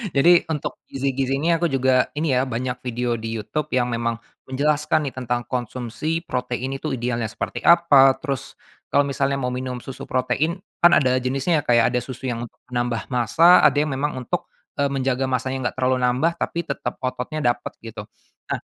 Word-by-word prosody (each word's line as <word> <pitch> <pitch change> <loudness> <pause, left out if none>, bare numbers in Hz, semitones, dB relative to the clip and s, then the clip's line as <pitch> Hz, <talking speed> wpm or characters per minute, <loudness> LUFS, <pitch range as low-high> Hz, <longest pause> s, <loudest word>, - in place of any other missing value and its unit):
Jadi 170 +5 +6
untuk 150 -3 -4
gizi-gizi 135 0 -1
ini 165 +4 +2
aku 170 +1 +1
juga 130 -2 +2
ini 155 -2 +1
ya, 130 +1 +1
banyak 125 +1 -3
video 125 -1 -2
di 115 0 -4
Youtube 150 +8 -3
yang 125 -3 +1
memang 115 0 -1 0.3
menjelaskan 150 +3 +1
nih 135 - -4
tentang 120 -2 -2
konsumsi 125 +7 -3
protein 125 0 -3
itu 155 - -3
idealnya 120 -2 -2
seperti 120 - -5
apa, 145 -6 +6
terus 140 -5 -5 0.3
kalau 145 - +4
misalnya 140 0 0
mau 125 -2 -2
minum 125 0 -4
susu 135 - -8
protein 130 +7 0 0.2
kan 175 0 +7
ada 130 -2 +2
jenisnya 135 +6 0
ya, - - -20
Kak, 120 - +4
ya, - - +5
ada 125 - +1
susu 130 +1 -8
yang 120 0 -4
untuk - - -30
menambah 120 0 -2
massa, 165 +9 +5
ada - - +5
yang 150 +1 +1
memang 140 +2 -2
untuk, 125 -2 -3 0.3
eee, 140 - +3
menjaga 135 -1 -1
massanya 130 0 -1
nggak - - -15
terlalu 130 0 +1
nambah 125 +6 +2
tapi 170 - -2
tetep 140 -4 -4
ototnya 130 +4 -3
dapet 120 - -9
gitu. 110 -2 -8 0.4
Nah, - - -1
130 Hz, 185 wpm, -22 LUFS, 125-145 Hz, 0.4 s, kan